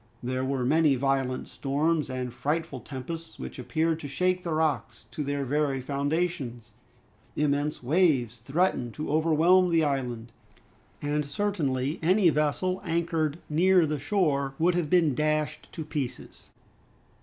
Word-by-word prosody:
There 130 +1 -1
were 130 -1 -1
many 150 +1 +4
violent 135 -1 0
storms 150 +2 0
and 125 -2 -4
frightful 150 0 -2
tempests, 155 +6 -7
which - - -7
appeared 160 0 0
to 145 - -6
shake 180 +6 0
the 170 - -4
rocks 155 -9 -1
to 150 +4 -3
their 140 0 -2
very 140 0 0
foundations. 140 -4 -2 0.6
Immense 145 -1 0
waves 135 - +2
threatened 130 -1 0
to 150 -1 -4
overwhelm 165 +4 +4
the 165 -1 +3
island, 125 -5 -2 0.7
and 150 +1 0
certainly 145 -4 -1
any 180 +1 +4
vessel 155 +5 0
anchored 165 -3 0
near 180 +3 +4
the 150 -1 -2
shore 140 -5 0
would 175 +2 +3
have 170 -4 -1
been 170 -5 +4
dashed 155 +2 -1
to 160 - -5
pieces. 145 -5 -6
150 Hz, 135 wpm, -27 LUFS, 135-165 Hz, 0.7 s, many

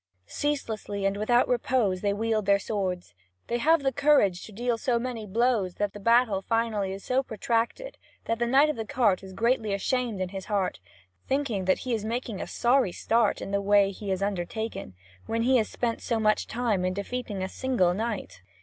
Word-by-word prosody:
Ceaselessly 220 - -3
and 195 0 +1
without 240 +4 +2
repose 235 -6 +1
they 205 - +1
wield 215 0 -1
their 200 0 +5
swords; 190 - -3 0.3
they 240 - -2
have 320 +2 +3
the 270 - +2
courage 280 -11 +3
to - - -10
deal 240 +3 -1
so 240 +1 0
many 235 -3 -4
blows 220 -3 +1
that 205 -1 -2
the 205 - -8
battle 230 -2 +3
finally 220 -3 0
is 195 +1 -7
so 255 +1 +1
protracted 235 - -2 0.3
that 230 0 -1
the 240 - +1
Knight 275 +5 +5
of 300 - -1
the 225 - -2
Cart 215 -4 +1
is 190 -1 -10
greatly 225 0 +1
ashamed 240 0 -1
in 185 -1 -2
his 190 0 -7
heart, 200 -4 -1 0.5
thinking 255 -9 -1
that 185 - +3
he 250 - -1
is 220 -2 -1
making 230 -2 -3
a - - -5
sorry 245 -5 +2
start 225 +3 +1
in - - -6
the 200 0 +1
way 200 0 +4
he 200 +1 -7
has 190 0 -1
undertaken, 200 - -4 0.3
when 230 0 0
he 255 +2 +4
has 220 - 0
spent 235 -2 -2
so 230 -2 -1
much 215 -1 +2
time 225 -6 0
in 185 0 0
defeating 205 -1 -4
a - - -1
single 210 -6 +1
knight. 215 - -4
220 Hz, 200 wpm, -27 LUFS, 195-245 Hz, 0.5 s, their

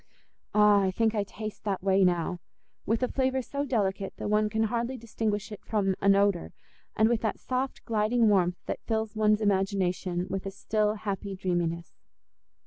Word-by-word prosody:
Ah! 210 -1 +6
I 190 - +2
think 220 +3 +1
I 210 -2 +1
taste 215 +1 -8
that 195 -3 -2
whey 195 0 +4
now—with 180 +6 -2
a - - +3
flavour 260 0 0
so 280 +3 -3
delicate 200 -6 -1
that 205 - -3
one 210 0 +3
can 220 +1 0
hardly 235 +3 -1
distinguish 220 -2 -3
it 210 - -9
from 200 -3 0
an 200 0 +5
odour, 200 -3 +1 0.4
and 220 - +4
with 235 -1 +1
that 220 - -1
soft 255 +1 -3
gliding 225 +1 +2
warmth 180 -4 +3
that - - -4
fills 220 -1 -1
one's 215 0 +3
imagination 190 -3 0
with 195 +1 -4
a - - -1
still, 210 +2 0
happy 200 -1 -4
dreaminess. 170 -2 -2
210 Hz, 170 wpm, -28 LUFS, 190-220 Hz, 0.4 s, Ah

